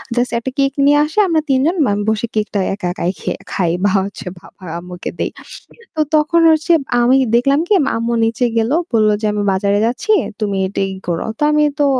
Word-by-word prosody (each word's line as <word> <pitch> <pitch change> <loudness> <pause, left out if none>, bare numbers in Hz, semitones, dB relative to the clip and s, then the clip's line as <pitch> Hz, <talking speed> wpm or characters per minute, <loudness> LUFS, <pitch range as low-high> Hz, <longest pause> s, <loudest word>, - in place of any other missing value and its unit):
Just 245 +1 0
একটা 260 +3 -5
cake 275 0 +2
নিয়ে 290 +1 +5
আসি 310 +6 -6
আমরা 325 -3 +1
৩ 265 -1 +3
জন 340 - +1
মানে 205 0 0
বসে 220 +2 -1
কেকটা 210 -1 -1
একা 190 -3 -4
একাই 180 -2 -2
খে - - -3 0.2
খাই 175 -3 0
বা 205 - +3
হচ্ছে 200 -1 -9
বাবা 190 - -18 0.2
আম্মুকে 180 0 -7
দেই - - -1 0.7
তো 310 - +1
তখন 310 +3 +3
হচ্ছে 315 +2 +1 0.3
আমি 255 +3 +4 0.2
দেখলাম 275 +4 +3
কি 425 - +2
মা - - 0
আম্মু 230 +1 -1
নিচে 230 +2 0
গেল। 225 +2 +1 0.2
বলল 215 -1 +3
যে - - -2
আমি 210 - -1
বাজারে 200 +2 +1
যাচ্ছি, 245 - -1 0.3
তুমি 205 -2 -1
এটা 195 - -4
ই 190 - -6
করো। 170 -1 -2
তো - - -21
আমি 300 0 +3 0.2
তো 290 - +3
230 Hz, 210 wpm, -17 LUFS, 200-280 Hz, 0.7 s, নিয়ে